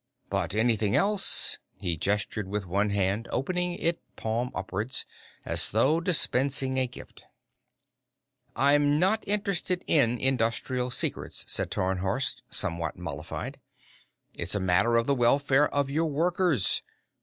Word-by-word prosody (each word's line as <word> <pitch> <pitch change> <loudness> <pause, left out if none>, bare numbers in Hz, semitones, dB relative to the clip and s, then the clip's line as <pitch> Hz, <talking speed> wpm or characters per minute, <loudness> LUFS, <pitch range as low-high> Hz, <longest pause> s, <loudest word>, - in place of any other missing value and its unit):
But 95 - -1
anything 110 -2 +1
else 205 0 +4
" - - -47
He 90 -4 -2
gestured 105 +3 -2
with 100 0 -3
one 100 +4 0
hand, 100 +3 -1
opening 180 +6 -1
it 170 -1 -1
palm 115 +3 -2
upwards, 105 +7 -2 0.4
as - - +2
though 135 - +2
dispensing 135 -6 +1
a 130 - +1
gift. 120 - -13 1.3
"I'm 145 +2 +3
not 190 +6 +2
interested 200 -3 -1
in 125 -6 +3
industrial 125 0 0
secrets," 120 - -1
said - - +1
Tarnhorst, 95 +7 -1
somewhat 85 0 -1
mollified. 80 -4 -6 0.7
"It's 85 +4 -1
a - - 0
matter 95 +6 +2
of 115 - +1
the 140 - +2
welfare 135 +3 +3
of 140 -1 -1
your 160 +3 0
workers. 165 - +1
125 Hz, 130 wpm, -27 LUFS, 105-150 Hz, 1.3 s, else